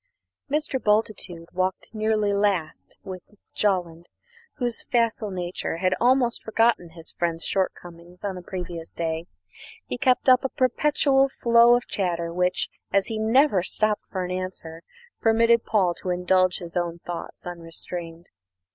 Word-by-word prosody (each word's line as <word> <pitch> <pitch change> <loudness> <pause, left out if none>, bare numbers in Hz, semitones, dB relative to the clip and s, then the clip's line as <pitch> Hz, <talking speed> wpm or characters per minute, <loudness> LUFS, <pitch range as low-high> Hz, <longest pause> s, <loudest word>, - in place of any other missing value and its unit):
Mr. 295 -3 -1
Bultitude 210 -6 0
walked 185 +3 -2
nearly 215 -1 +1
last 200 -6 -1
with 185 -3 -7 0.3
Jolland, 175 -4 -1 0.5
whose 240 -2 -2
facile 230 -3 +1
nature 180 -3 -3
had 185 +1 +1
almost 245 -1 +3
forgotten 220 -6 +1
his 165 -1 -7
friend's 170 -1 -2
shortcomings 175 -2 -4
on 200 -2 -2
the 180 - -7
previous 175 -2 -7
day. 165 0 -2 0.6
He 125 - -5
kept 255 +1 +2
up 255 -1 +6
a 265 - 0
perpetual 270 +1 +2
flow 235 -1 +5
of 245 - -1
chatter 170 -3 -2
which, 180 +1 +1 0.2
as 195 -1 +3
he 215 - -2
never 225 -1 +4
stopped 210 +3 0
for 185 -2 -3
an 180 - -5
answer, 180 -3 -5 0.4
permitted 230 +1 +4
Paul 190 -5 +2
to 185 - -4
indulge 180 +1 +2
his 170 -1 -7
own 170 -1 -1
thoughts 175 -1 -7
unrestrained. 170 0 -7
185 Hz, 140 wpm, -25 LUFS, 175-225 Hz, 0.6 s, up